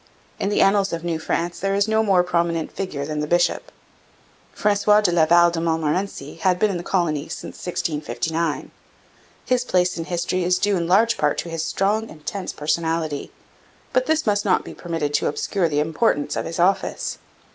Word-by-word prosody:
In 195 - 0
the 205 - +3
annals 195 0 +3
of 165 0 -3
New 170 -2 -2
France 170 +2 -2
there 195 +1 0
is 200 +1 +2
no 220 0 +2
more 195 -4 +3
prominent 170 -2 -1
figure 155 -8 -4
than 150 0 -3
the 150 - -2
bishop. 175 - +1 0.8
Francois 210 0 +3
de 195 -4 +2
Laval 170 +1 +5
de 165 -1 -2
Montmorency 160 -1 -2
had 180 +2 +2
been 210 +3 +2
in 185 - -2
the - - -4
colony 160 -6 -1
since - - -7
1659. 160 -1 -2 0.7
His 250 -1 +1
place 180 -5 +1
in 165 - -3
history 175 +1 -1
is 180 +1 +2
due 205 +2 +1
in 170 -2 -1
large 225 +6 +3
part 150 -1 +1
to 170 - -3
his 165 -1 -3
strong, 210 +6 0
intense 175 +5 -5
personality, 155 0 -2 0.6
but 255 0 +2
this 315 0 +1
must 205 -2 +1
not 190 -3 +2
be - - -8
permitted 165 -4 -3
to 150 - +1
obscure 170 +4 0
the 145 -1 0
importance 155 +1 0
of - - -2
his 165 - -5
office. 185 +3 0
175 Hz, 185 wpm, -22 LUFS, 160-195 Hz, 0.8 s, Laval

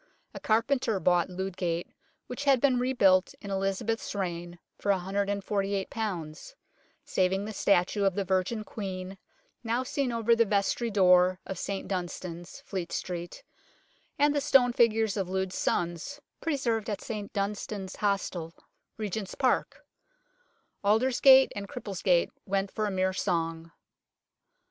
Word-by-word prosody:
A - - -7
carpenter 230 -1 +1
bought 175 -1 +2
Ludgate, 180 -2 -3 0.3
which 265 +4 -6
had 275 -2 +5
been 255 -1 +3
rebuilt 200 -8 +3
in 200 - -7
Elizabeth's 195 +4 -2
reign, 175 -2 -4 0.2
for 205 - -3
148, 200 +1 -1 1.1
saving 190 +2 +1
the 215 - -5
statue 200 +1 +2
of 195 -2 +2
the 200 - 0
Virgin 190 +4 0
Queen 190 -2 -6 0.4
now 235 +2 0
seen 260 0 -1
over 230 0 +3
the 230 - +4
vestry 210 +3 0
door 180 -2 +4
of 190 - -5
St 195 -1 -4
Dunstan's, 175 -2 -5
Fleet 180 -4 -4
Street, 175 -1 -5 0.7
and 290 +1 +4
the 290 - +1
stone 250 -3 +4
figures 225 -3 +3
of 190 -2 -2
Lud's 190 0 -1
sons, 175 - -2 0.2
preserved 240 -8 -1
at 205 -2 -3
St 210 -3 -5
Dunstan's 200 -1 -3
Hostel, 185 -5 -1 0.4
Regent's 210 -2 -4
Park; 260 -2 0 1.0
Aldersgate 260 +5 +6
and 200 -1 -5
Cripplegate 190 -6 0 0.2
went 195 0 0
for 215 -1 -1
a - - -2
mere 190 0 +1
song. 165 -2 -2
200 Hz, 130 wpm, -29 LUFS, 185-225 Hz, 1.1 s, Aldersgate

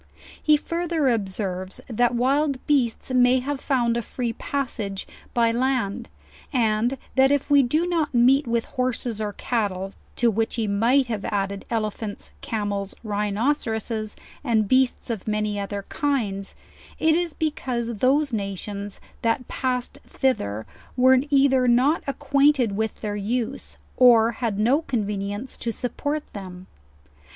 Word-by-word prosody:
He 305 -1 +5
further 335 -2 0
observes 190 -4 -2
that 240 +1 +1
wild 275 +3 +2
beasts 260 -4 +1
may 250 0 +5
have 270 +2 -2
found 240 -4 +1
a 235 - 0
free 235 +1 -3
passage 225 -8 -3 0.3
by 230 -1 +4
land; 240 -2 -1 0.4
and 235 0 +1 0.2
that 265 0 +5
if 285 +1 0
we 285 -1 +7
do 300 +7 +1
not 335 -4 0
meet 255 +3 +4
with 230 0 0
horses 250 -4 -2
or 210 -1 -2
cattle 200 -5 -2 0.2
(to 235 -1 +3
which 225 +2 -1
he 230 -2 0
might 230 +7 +3
have 220 -4 -4
added 200 -1 -2
elephants, 215 -2 -3
camels, 205 -3 -3
rhinoceroses, 215 +1 -1 0.3
and 225 -6 +2
beasts 255 0 +2
of 220 -3 -5
many 210 -1 -1
other 200 0 -4
kinds) 215 -9 -1 0.4
it 315 0 +3
is 345 -2 0
because 240 -7 -2
those 275 +2 +2
nations 200 0 -4 0.2
that 230 +2 0
passed 255 +1 -2
thither, 110 - -1 0.3
were 260 +1 +6
either 270 -2 +4
not 255 +7 +4
acquainted 275 -5 +2
with 220 +1 -2
their 210 -1 -3
use, 230 +5 -3 0.2
or 235 -3 +6
had 225 -3 -2
no 245 +9 +3
convenience 210 -2 -3
to 235 - -2
support 290 +6 -3
them. 185 -2 -8
235 Hz, 135 wpm, -24 LUFS, 210-265 Hz, 0.4 s, we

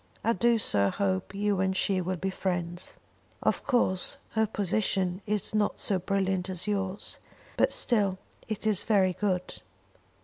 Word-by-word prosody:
I 230 - +3
do 235 +4 +3
so 100 - +2
hope 190 -1 -1
you 205 -1 +1
and 190 0 +1
she 190 -2 +1
will 185 +1 -1
be 190 +2 -2
friends. 175 -2 -3 0.5
Of - - +1
course 190 -8 +2
her 220 -1 +2
position 195 -2 0
is 210 -1 -1
not 210 -1 +1
so 195 -2 +1
brilliant 190 0 0
as 180 -2 -2
yours, 195 -1 -2 0.4
but - - +3
still 200 -5 +2 0.3
it 215 -1 -4
is 215 -4 +3
very 195 -4 +3
good. 185 -2 -2
195 Hz, 150 wpm, -29 LUFS, 185-210 Hz, 0.5 s, I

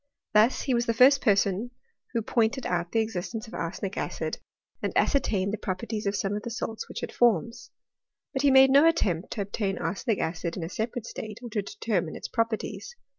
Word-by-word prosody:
"jDius 215 +4 +4
he 265 - 0
was 240 0 +1
the 230 - +1
first 265 +4 +6
person 200 +1 +2 0.4
who 230 -2 0
pointed 235 +3 +1
out 175 -1 -1
the 225 - +2
existence 220 +1 -4
of - - -13
arsenic 185 +3 -4
acid, - - -3 0.4
and - - -1
ascertained 200 -8 +1
the 220 - -3
properties 210 +3 -3
of 200 - 0
some 200 0 -1
of 210 - -3
the 235 - -5
salts 225 -1 -5
which - - -6
it - - -4
forms. 235 - +1 0.6
But 265 - 0
he 285 - +5
made 265 0 +7
no 285 +4 +7
attempt 190 - +1
to 215 - -3
ob 200 0 -5
tain 195 -4 -1
arsenic 215 +1 -1
acid 165 +1 -3
in 175 - -3
a 165 - -4
separate 220 +3 -3
state, 215 -3 -7
or 240 - -7
to 210 - 0
determine 195 -4 -2
its - - -6
properties. 230 - -2
220 Hz, 205 wpm, -27 LUFS, 195-240 Hz, 0.6 s, made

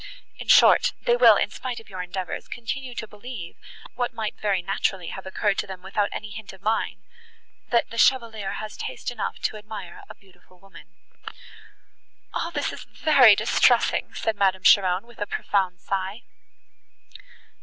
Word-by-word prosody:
In - - -8
short, - - +6
they 485 -1 +3
will, - - +7
in - - 0
spite 250 -2 -5
of 225 - -17
your 185 -2 -6
endeavours, 180 0 -5
continue 250 +2 -5
to 220 - -5
believe, 210 -4 -9 0.4
what 245 -1 -3
might 215 -2 -3
very 200 -4 0
naturally 190 -1 -1
have 190 0 -8
occurred 200 +1 0
to - - -2
them 185 -1 -9
without 200 +2 -1
any 210 -1 -6
hint 205 -1 -9
of 190 0 -17
mine—that 250 - -3
the 230 - -4
Chevalier 225 -7 +2
has 215 -1 -6
taste - - -5
enough 225 -4 -4
to 215 - -1
admire 210 -4 -9
a - - -10
beautiful 185 -1 -24
woman." 195 +1 -17 1.4
"All - - -2
this - - -2
is - - -8
very 265 -9 +6
distressing!" - - +2
said 225 - -1
Madame 190 -2 +1
Cheron, 185 0 +5
with 235 -1 -18
a 205 - -2
profound 185 -3 -1
sigh. 195 +5 -4
205 Hz, 160 wpm, -24 LUFS, 190-235 Hz, 1.4 s, will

